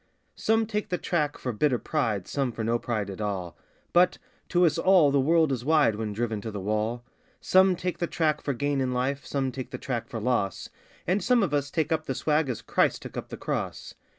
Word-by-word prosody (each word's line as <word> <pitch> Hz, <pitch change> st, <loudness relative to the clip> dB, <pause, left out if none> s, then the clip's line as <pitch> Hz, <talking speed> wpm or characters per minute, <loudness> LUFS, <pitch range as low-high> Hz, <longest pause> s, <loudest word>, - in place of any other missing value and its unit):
Some 225 Hz, 0 st, +2 dB
take 210 Hz, -1 st, -3 dB
the 180 Hz, -, 0 dB
track 150 Hz, -5 st, -1 dB
for 125 Hz, -, -3 dB
bitter 130 Hz, +3 st, +2 dB
pride, 115 Hz, -, -1 dB
some 135 Hz, -3 st, -1 dB
for 110 Hz, 0 st, -5 dB
no 115 Hz, +2 st, +1 dB
pride 110 Hz, -4 st, -2 dB
at 95 Hz, -, -7 dB
all 95 Hz, -5 st, -3 dB, 0.4 s
(But 180 Hz, +1 st, +4 dB, 0.3 s
to 175 Hz, 0 st, +4 dB
us 160 Hz, -1 st, +2 dB
all 175 Hz, -5 st, +5 dB
the 140 Hz, -, +3 dB
world 160 Hz, +2 st, +3 dB
is 125 Hz, -3 st, -2 dB
wide 150 Hz, -5 st, +4 dB
when 110 Hz, 0 st, -3 dB
driven 110 Hz, 0 st, -2 dB
to 110 Hz, -, -5 dB
the 105 Hz, -2 st, -5 dB
wall) 110 Hz, +4 st, -1 dB, 0.4 s
Some 190 Hz, 0 st, +4 dB
take 180 Hz, 0 st, -3 dB
the 170 Hz, -, 0 dB
track 155 Hz, -3 st, 0 dB
for 140 Hz, -, -2 dB
gain 145 Hz, +1 st, 0 dB
in 130 Hz, -1 st, 0 dB
life, 130 Hz, +2 st, -1 dB
some 135 Hz, -2 st, -1 dB
take 130 Hz, 0 st, -6 dB
the -, -, -5 dB
track 120 Hz, -4 st, -3 dB
for 115 Hz, -, -5 dB
loss 110 Hz, -4 st, -1 dB, 0.4 s
And 185 Hz, +2 st, +1 dB
some 240 Hz, 0 st, +3 dB
of 170 Hz, -, -1 dB
us 145 Hz, -1 st, 0 dB
take 160 Hz, +1 st, -1 dB
up 160 Hz, -1 st, 0 dB
the 135 Hz, -, -2 dB
swag 150 Hz, 0 st, +1 dB
as 120 Hz, -, -4 dB
Christ -, -, +1 dB
took -, -, -9 dB
up -, -, -5 dB
the -, -, -7 dB
Cross. -, -, -4 dB
140 Hz, 230 wpm, -27 LUFS, 115-160 Hz, 0.4 s, all